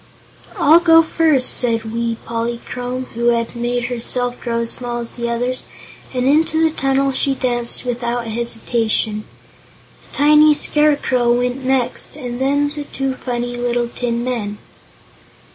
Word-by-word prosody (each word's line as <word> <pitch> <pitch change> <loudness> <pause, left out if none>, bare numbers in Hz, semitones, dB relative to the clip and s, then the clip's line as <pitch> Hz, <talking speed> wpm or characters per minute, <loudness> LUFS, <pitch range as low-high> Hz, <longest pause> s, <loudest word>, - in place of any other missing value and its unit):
"I'll 315 +4 +6
go 330 -1 +6
first," 315 -5 +2
said 225 -2 -1
wee 230 -1 -1
Polychrome, 240 +2 -4
who 235 +1 -3
had 235 0 +1
made 240 +1 -1
herself 245 0 -2
grow 235 -1 -1
as 230 - -2
small 240 -1 -4
as 235 -1 -5
the 235 -1 -3
others, 245 +2 -1 0.5
and 250 -1 -1
into 315 +3 +3
the 320 0 +3
tunnel 270 0 +1
she 270 +1 +1
danced 240 -2 -1
without 240 -1 -2
hesitation. 225 -1 -1 0.9
A - - -8
tiny 300 +1 +6
Scarecrow 285 -6 +2
went 250 +2 -1
next 260 0 -1
and 250 -3 -6
then 285 +2 +2
the 295 -1 -6
two 270 -1 -3
funny 245 -1 -4
little 240 0 -1
tin 235 -1 -2
men. 225 -5 -3
245 Hz, 145 wpm, -18 LUFS, 235-270 Hz, 0.9 s, I'll